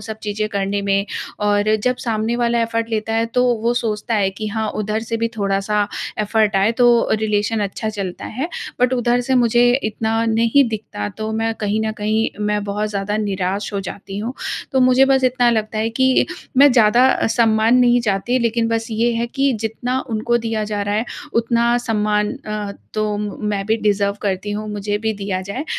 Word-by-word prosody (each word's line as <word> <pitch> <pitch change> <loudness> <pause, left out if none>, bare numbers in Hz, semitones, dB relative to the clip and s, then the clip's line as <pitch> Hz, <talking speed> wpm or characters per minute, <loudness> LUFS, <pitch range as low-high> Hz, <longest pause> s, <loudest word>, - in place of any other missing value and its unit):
सब 220 0 -7
चीज़ें 215 0 -2
करने 200 0 -1
में 200 0 +1 0.4
और 205 +1 +2
जब 250 0 +2
सामने 225 0 -1
वाला 235 -1 +1
एफ़र्ट 230 0 -2
लेता 225 0 -1
है, 225 0 +1
तो 250 +2 +1 0.2
वो 235 +1 +2
सोचता 225 -1 -2
है 195 -3 +2
कि 215 +3 -6
हाँ 220 0 -2
उधर 215 +1 -2
से 230 0 -3
भी 230 0 0
थोड़ा-सा 200 +1 0 0.3
एफ़र्ट 215 -1 +1
आए, 200 +4 +3
तो 240 -1 +4
रिलेशन 215 0 0
अच्छा 205 +2 -3
चलता 200 -4 -5
है। 270 +9 -4 0.3
बट 250 +1 +3
उधर 245 0 +2
से 260 +2 0
मुझे 240 0 +4 0.2
इतना 220 +1 0
नहीं 230 +5 +3
दिखता, 205 - -5
तो 215 - -5
मैं 225 0 -1
कहीं 210 0 -1
न 220 - -1
कहीं 215 +2 +1 0.2
मैं 210 0 0
बहुत 205 +1 -2
ज़्यादा 205 +1 -2
निराश 200 -1 -2
हो 200 - -1
जाती 195 +1 -7
हूँ। 230 +4 -3 0.4
तो 265 - +3
मुझे 255 +1 +5
बस 265 -1 +3
इतना 245 -1 +3
लगता 215 -1 -1
है 220 +1 0
कि 260 +2 +3 0.3
मैं 285 +2 +7
ज़्यादा 240 +2 +4
सम्मान 225 0 +3
नहीं 245 -1 +4
चाहती, 225 +3 0
लेकिन 230 -1 0
बस 225 0 -1
ये 230 +2 +1
है 230 +1 -1
कि 275 +3 0
जितना 245 +3 -2
उनको 225 +2 +1
दिया 225 -2 -2
जा 210 -1 -2
रहा 205 0 -1
है, 220 +3 0 0.3
उतना 235 +1 +2
सम्मान 210 -3 0
अ, 210 -1 -4 0.2
तो 215 -1 0
मैं 210 -1 -3
भी 220 - +2
डिज़र्व 205 -2 +1
करती 195 0 -2
हूँ, 210 +1 -4
मुझे 205 0 -2
भी 220 0 -1
दिया 195 -2 -3
जाए। 200 +10 -5
220 Hz, 195 wpm, -19 LUFS, 210-235 Hz, 0.4 s, मैं